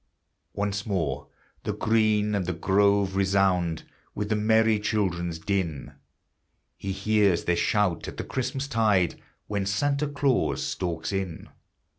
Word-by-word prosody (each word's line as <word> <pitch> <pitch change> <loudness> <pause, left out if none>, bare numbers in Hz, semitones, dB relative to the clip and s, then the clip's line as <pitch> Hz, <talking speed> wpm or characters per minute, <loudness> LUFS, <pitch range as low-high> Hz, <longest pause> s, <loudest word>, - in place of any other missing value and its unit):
Once 100 -1 -1
more 80 -10 -2 0.4
the - - -2
green 110 -1 +2
and 95 -4 -1
the 90 - 0
grove 100 +2 +2
resound 95 -4 +2 0.3
With 105 0 -3
the 110 - +2
merry 110 0 +3
children's 90 -6 -1
din; 85 -4 -2 0.8
He 100 - -5
hears 100 -2 +2
their 85 - +1
shout 105 -3 +1
at - - -7
the - - -3
Christmas 130 +1 -3
tide, 105 - +2 0.2
When 100 -2 -2
Santa 140 +9 +1
Claus 140 -2 +1
stalks 80 -3 -3
in. 95 -4 -4
100 Hz, 130 wpm, -26 LUFS, 90-110 Hz, 0.8 s, merry